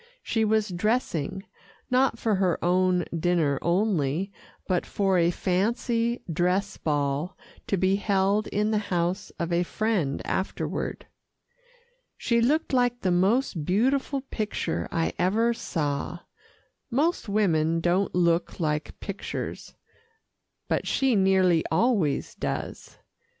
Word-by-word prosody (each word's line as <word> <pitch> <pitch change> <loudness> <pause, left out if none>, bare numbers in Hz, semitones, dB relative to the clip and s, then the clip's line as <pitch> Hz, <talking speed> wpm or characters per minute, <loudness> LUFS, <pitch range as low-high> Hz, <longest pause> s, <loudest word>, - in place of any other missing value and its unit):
She 225 - 0
was 215 -1 +2
dressing, 190 - -1 0.5
not 255 -1 +3
for 225 -1 0
her 185 -3 +2
own 180 -1 +2
dinner 165 -4 +1
only, 175 -1 0 0.4
but 180 -2 +1
for 195 -3 +1
a 170 0 +4
fancy 230 +7 0
dress 180 +4 0
ball 145 +2 -1 0.3
to 195 - +1
be 190 +2 +2
held 200 +1 +1
in 210 +1 0
the 215 - +2
house 175 +2 -1
of 170 0 -2
a 170 - +3
friend 180 -6 -1
afterward. 190 - -3 1.1
She 235 -1 +1
looked 295 +5 +1
like 245 -1 +2
the 185 - +1
most 190 - +2
beautiful 265 - +1
picture 210 - -3
I 165 -1 0
ever 220 +7 +2
saw. 155 -3 -3 0.7
Most 285 0 0
women 165 -6 +2
don't 175 +4 +1
look 170 0 +1
like 150 -2 -2
pictures, 200 -1 -6 0.9
but - - -1
she 265 -3 +2
nearly 190 -4 +4
always 170 - +1
does. - - -5
190 Hz, 120 wpm, -26 LUFS, 170-220 Hz, 1.1 s, a